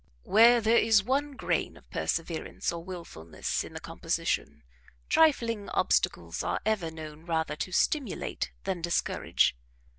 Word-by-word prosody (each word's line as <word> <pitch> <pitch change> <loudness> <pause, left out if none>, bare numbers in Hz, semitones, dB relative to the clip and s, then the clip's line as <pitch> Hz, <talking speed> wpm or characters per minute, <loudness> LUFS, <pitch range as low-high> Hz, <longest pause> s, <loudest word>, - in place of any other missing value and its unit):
Where 230 +3 +6
there 225 +2 +4
is 220 -3 +4
one 280 +5 0
grain 265 - -1
of - - -19
perseverance 165 -1 -2
or 170 -1 -6
wilfulness 170 - -4
in - - -10
the - - -4
composition, 75 +1 -2 0.5
trifling 230 -10 +3
obstacles - - 0
are - - -1
ever 210 -7 0
known 155 -1 -9
rather 160 -2 -1
to 185 - -4
stimulate 280 - 0
than 185 -3 -2
discourage. 170 - +1
190 Hz, 130 wpm, -29 LUFS, 160-230 Hz, 0.5 s, Where